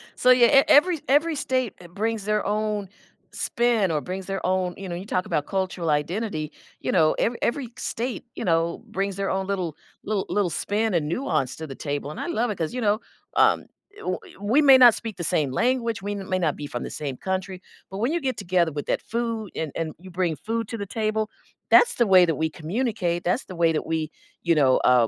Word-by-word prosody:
So 255 Hz, -, +4 dB
yeah, 245 Hz, -2 st, +7 dB
e 275 Hz, +1 st, +7 dB
e -, -, -2 dB
every 325 Hz, +2 st, +5 dB
every 305 Hz, +4 st, +3 dB
state 255 Hz, -4 st, -1 dB, 0.2 s
brings 220 Hz, 0 st, -2 dB
their 210 Hz, 0 st, 0 dB
own 210 Hz, -1 st, -1 dB, 0.4 s
spin 235 Hz, -6 st, +1 dB
or 150 Hz, -2 st, 0 dB
brings 185 Hz, +3 st, -5 dB
their 195 Hz, 0 st, -4 dB
own 185 Hz, -1 st, 0 dB
you 195 Hz, -2 st, -7 dB
know, 175 Hz, -, -3 dB
you 185 Hz, +3 st, -6 dB
talk 185 Hz, -3 st, -1 dB
about 145 Hz, -, 0 dB
cultural 185 Hz, -4 st, -2 dB
identity, 155 Hz, +1 st, -1 dB, 0.3 s
you -, -, -1 dB
know, 155 Hz, -1 st, +4 dB
every 235 Hz, +1 st, +1 dB
every 245 Hz, -1 st, -1 dB
state, 245 Hz, +3 st, -3 dB
you -, -, -5 dB
know, 165 Hz, 0 st, +1 dB
brings 195 Hz, 0 st, -2 dB
their 195 Hz, 0 st, -2 dB
own 190 Hz, 0 st, -1 dB
little 185 Hz, -6 st, -2 dB, 0.3 s
little 205 Hz, -2 st, -1 dB
little 205 Hz, -3 st, +1 dB
spin 210 Hz, +5 st, -1 dB
and 155 Hz, -3 st, +1 dB
nuance 160 Hz, -, -1 dB
to 160 Hz, -, -6 dB
the 135 Hz, -, -8 dB
table, 145 Hz, 0 st, -4 dB
and -, -, -8 dB
I -, -, -3 dB
love 245 Hz, -8 st, 0 dB
it 205 Hz, -, -3 dB
'cause, 160 Hz, +2 st, -2 dB
you 250 Hz, -, -3 dB
know, 210 Hz, 0 st, +2 dB, 0.4 s
um, -, -, +4 dB, 0.3 s
eh, -, -, -12 dB
w 185 Hz, 0 st, -2 dB, 0.2 s
we 230 Hz, +9 st, +3 dB
may 275 Hz, -3 st, +8 dB
not 245 Hz, -3 st, +8 dB
speak 220 Hz, -5 st, -6 dB
the 175 Hz, -, -4 dB
same 150 Hz, -4 st, +1 dB
language, 235 Hz, -, 0 dB
we 205 Hz, +1 st, -3 dB
may 185 Hz, -1 st, -2 dB
not 160 Hz, -5 st, +1 dB
be 145 Hz, -, -6 dB
from 120 Hz, -3 st, -5 dB
the -, -, -5 dB
same 140 Hz, -4 st, -4 dB
country, 190 Hz, +1 st, -3 dB, 0.3 s
but 195 Hz, -, -5 dB
when 240 Hz, +6 st, +1 dB
you 345 Hz, -, +1 dB
get 260 Hz, -2 st, -2 dB
together 175 Hz, -4 st, +1 dB
with 145 Hz, -1 st, -5 dB
that -, -, 0 dB
food 230 Hz, -3 st, -3 dB
and 160 Hz, -3 st, -3 dB
and 160 Hz, -2 st, -3 dB
you 185 Hz, +2 st, -12 dB
bring 175 Hz, -2 st, 0 dB
food 225 Hz, +5 st, -3 dB
to 230 Hz, -, -4 dB
the 200 Hz, -, -4 dB
table, 215 Hz, +1 st, -1 dB, 0.4 s
that's 480 Hz, 0 st, +6 dB
the 235 Hz, -, +2 dB
way 185 Hz, -2 st, +7 dB
that 165 Hz, -2 st, 0 dB
we 160 Hz, +1 st, 0 dB
communicate, 175 Hz, +1 st, -2 dB
that's 180 Hz, +9 st, 0 dB
the 185 Hz, -, -9 dB
way 170 Hz, -1 st, +3 dB
that 155 Hz, -, -2 dB
we 160 Hz, -1 st, -2 dB, 0.3 s
you 170 Hz, -1 st, +3 dB
know, 135 Hz, -4 st, +4 dB
uh, 125 Hz, -2 st, +4 dB
195 Hz, 230 wpm, -25 LUFS, 165-230 Hz, 0.4 s, may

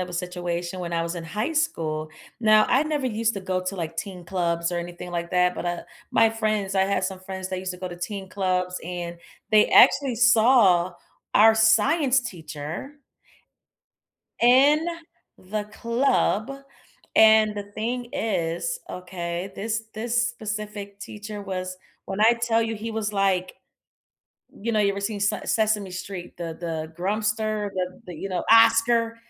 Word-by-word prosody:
of 180 Hz, -, -3 dB
a -, -, -9 dB
situation 175 Hz, 0 st, -4 dB
when 170 Hz, -1 st, -4 dB
I 165 Hz, 0 st, 0 dB
was 170 Hz, +1 st, -3 dB
in 170 Hz, -, -5 dB
high 215 Hz, -, -3 dB
school. 160 Hz, -, -1 dB, 0.3 s
Now, 215 Hz, -1 st, +5 dB
I 265 Hz, +4 st, +4 dB
never 300 Hz, -4 st, -1 dB
used 225 Hz, 0 st, 0 dB
to 195 Hz, -, -4 dB
go 185 Hz, -1 st, -1 dB
to, 195 Hz, +1 st, -3 dB
like, 165 Hz, -2 st, -5 dB
teen 185 Hz, -3 st, -6 dB
clubs 170 Hz, -1 st, -1 dB
or 175 Hz, -, -1 dB
anything 175 Hz, +1 st, -8 dB
like 170 Hz, 0 st, -3 dB
that, 180 Hz, 0 st, +2 dB
but, -, -, -5 dB
uh, 175 Hz, 0 st, -2 dB, 0.3 s
my 225 Hz, 0 st, +5 dB
friends 215 Hz, -3 st, -1 dB
I 190 Hz, -, +4 dB
had 195 Hz, 0 st, 0 dB
some 185 Hz, 0 st, -4 dB
friends 190 Hz, 0 st, -6 dB
that 185 Hz, -, -2 dB
used 185 Hz, 0 st, -4 dB
to 180 Hz, -, -6 dB
go 185 Hz, -, -5 dB
to 175 Hz, -, -8 dB
teen 190 Hz, +2 st, -5 dB
clubs, 185 Hz, -1 st, -1 dB
and 175 Hz, 0 st, -5 dB, 0.4 s
they 210 Hz, 0 st, +6 dB
actually 265 Hz, -1 st, +5 dB
saw 220 Hz, -6 st, +5 dB, 0.4 s
our 220 Hz, +1 st, +7 dB
science 255 Hz, +6 st, +4 dB
teacher 165 Hz, -, -7 dB, 1.5 s
in 280 Hz, +7 st, +5 dB, 0.5 s
the 205 Hz, +3 st, -4 dB
club, 230 Hz, +1 st, 0 dB, 0.6 s
and 220 Hz, -1 st, +6 dB
the 205 Hz, -, -4 dB
thing 240 Hz, +3 st, -3 dB
is, 225 Hz, -, -1 dB
okay, 180 Hz, 0 st, -5 dB
this 225 Hz, +2 st, -3 dB
this 235 Hz, +2 st, 0 dB
specific 210 Hz, -3 st, -6 dB
teacher 210 Hz, 0 st, -7 dB
was 185 Hz, -1 st, -4 dB, 0.3 s
when 195 Hz, +2 st, -4 dB
I 230 Hz, +2 st, +6 dB
tell 230 Hz, -1 st, +2 dB
you 225 Hz, 0 st, -2 dB
he 220 Hz, +2 st, -5 dB
was 220 Hz, -1 st, -2 dB
like 190 Hz, -2 st, +1 dB, 1.0 s
you 230 Hz, +3 st, -4 dB
know, 215 Hz, -, +2 dB
you 200 Hz, -1 st, +3 dB
ever 200 Hz, 0 st, -4 dB
seen 205 Hz, 0 st, -3 dB
S -, -, -2 dB
Sesame 215 Hz, -3 st, +1 dB
Street, 180 Hz, -1 st, -7 dB
the 165 Hz, -2 st, -5 dB
the 160 Hz, -2 st, -4 dB
Grumpster, 215 Hz, +1 st, -1 dB
the 185 Hz, -1 st, -4 dB
the, 180 Hz, -, -8 dB
you 195 Hz, -, -5 dB
know, 180 Hz, -2 st, -2 dB
Oscar, 230 Hz, 0 st, +5 dB
200 Hz, 165 wpm, -24 LUFS, 180-225 Hz, 1.5 s, our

